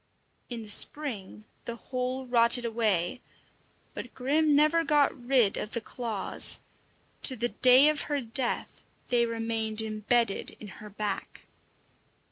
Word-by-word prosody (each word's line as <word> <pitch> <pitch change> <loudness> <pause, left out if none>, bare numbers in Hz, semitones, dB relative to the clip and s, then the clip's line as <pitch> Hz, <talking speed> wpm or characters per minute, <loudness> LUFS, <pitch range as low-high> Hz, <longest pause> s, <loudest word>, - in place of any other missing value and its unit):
In 235 -2 -6
the - - -12
spring 215 -3 0 0.2
the 235 - -5
whole 255 +2 -5
rotted 240 0 +3
away, 220 -3 -1 0.7
but 245 - -9
Grim 295 +4 +1
never 305 +3 +3
got 295 -2 +1
rid 245 -5 +1
of 210 - -6
the 235 - -1
claws. 225 -3 +1 0.6
To 260 - +5
the 240 0 -2
day 255 +4 +6
of 305 -1 +1
her 290 -1 -1
death 240 0 -1 0.3
they 235 -1 +1
remained 225 -1 -3
embedded 220 0 -1
in 210 - -11
her 210 - -10
back. 205 -1 -6
235 Hz, 130 wpm, -27 LUFS, 220-260 Hz, 0.7 s, day